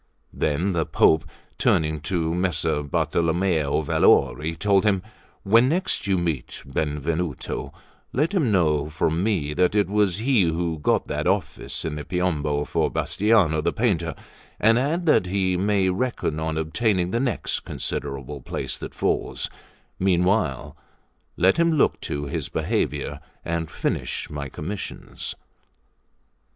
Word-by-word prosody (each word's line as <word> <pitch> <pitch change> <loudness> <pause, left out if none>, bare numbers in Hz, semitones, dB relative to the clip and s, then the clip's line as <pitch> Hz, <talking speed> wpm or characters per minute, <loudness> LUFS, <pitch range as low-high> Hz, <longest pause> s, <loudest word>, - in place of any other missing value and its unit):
Then 85 +7 0
the 80 -2 0
Pope 80 0 +4 0.3
turning 80 -1 +2
to 80 -3 0
Messer 85 -4 0
Bartolommeo 80 +1 +1
Valori, 80 +2 +3
told 100 -2 +3
him: 100 -4 +2 0.4
"When 115 +5 +5
next 175 - -1
you 95 -1 +2
meet 85 -6 -3
Benvenuto, 75 +2 -2 0.4
let 150 +9 0
him 155 - +2
know 75 -6 +2
from 80 +2 0
me 90 -9 0
that 90 +4 +2
it 100 -3 +3
was 100 -2 +2
he 120 0 +3
who 85 -1 0
got 75 - +1
that - - -2
office - - -1
in 75 -1 -3
the 75 - -5
Piombo 75 -5 -1
for - - 0
Bastiano 100 -8 +2
the - - +2
painter, 85 - 0 0.4
and 115 +2 +4
add 160 +7 0
that 150 - +4
he 95 -1 +1
may 100 +1 +2
reckon 95 -7 -1
on 80 0 -2
obtaining 90 +3 0
the 115 - +1
next 125 -2 -1
considerable 70 +1 -4
place - - -4
that - - -7
falls; - - -1 0.5
meanwhile 90 - +1 0.6
let 95 - +4
him 170 -1 +3
look 150 - +2
to 70 0 -3
his 70 - -3
behaviour, 75 -1 -1 0.3
and 85 -1 -2
finish - - -3
my 70 -2 -5
commissions." 90 +10 -5
90 Hz, 135 wpm, -24 LUFS, 80-105 Hz, 0.6 s, When